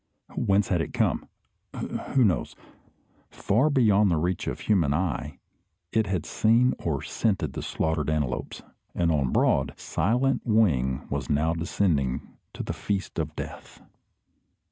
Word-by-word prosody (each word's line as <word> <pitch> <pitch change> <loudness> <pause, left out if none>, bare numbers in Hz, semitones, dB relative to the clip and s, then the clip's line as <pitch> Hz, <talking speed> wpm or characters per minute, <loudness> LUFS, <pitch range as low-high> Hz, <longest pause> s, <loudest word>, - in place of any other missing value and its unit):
Whence 100 +1 +2
had 90 -4 +2
it - - -5
come? - - 0 0.5
Who 130 -3 0
knows? 90 -6 0 0.7
Far 115 +10 +1
beyond 105 -7 +4
the 85 - +2
reach 90 +3 -1
of - - -3
human 85 -9 +2
eye 75 -4 -2 0.5
it 110 -2 +1
had 95 -4 -1
seen 115 +3 +3
or 75 -5 -2
scented 105 -5 -1
the - - -4
slaughtered 80 -1 -1
antelopes, 75 -5 -2 0.3
and 85 -1 +2
on 70 -5 +1
broad, 70 -1 +2
silent 125 +7 +1
wing 75 - +2
was - - -3
now 75 +3 +2
descending 80 -6 -1 0.2
to - - -4
the - - -3
feast 100 -4 -3
of 75 -1 -3
death. - - -8
85 Hz, 140 wpm, -26 LUFS, 75-105 Hz, 0.7 s, beyond